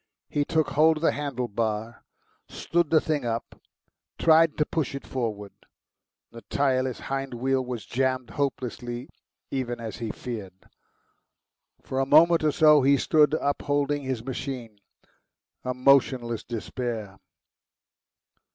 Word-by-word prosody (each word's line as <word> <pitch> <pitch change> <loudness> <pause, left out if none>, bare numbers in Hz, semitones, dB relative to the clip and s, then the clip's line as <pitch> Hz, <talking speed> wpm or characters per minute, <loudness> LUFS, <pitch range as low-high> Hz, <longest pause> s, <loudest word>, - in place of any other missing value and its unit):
He 145 - 0
took 160 -1 +1
hold 155 +3 +4
of 155 - -7
the - - +4
handle 140 -4 -3
bar, 110 +1 -3 0.5
stood 170 -2 0
the 160 - +5
thing 150 -3 -1
up, 115 -1 -4 0.6
tried 165 -1 +4
to 150 - +2
push 150 -4 -2
it 140 - -7
forward. 105 -6 -4 0.8
The 115 - -11
tyreless 130 -2 0
hind 135 -1 -4
wheel 130 +2 0
was 125 -5 -6
jammed 130 0 -1
hopelessly, 125 -3 -3 0.4
even 120 -3 -3
as 110 -3 -6
he 115 -2 -4
feared. 105 -6 -6 1.3
For 130 - -3
a 135 - +1
minute 165 +3 +6
or 155 - +3
so 150 0 +6
he 140 +2 +4
stood 150 +1 +3
upholding 145 0 0
his 130 -4 -4
machine, 125 -5 -5 0.8
a 125 0 -2
motionless 125 -3 +2
despair. 115 -4 -5
130 Hz, 130 wpm, -26 LUFS, 120-145 Hz, 1.3 s, minute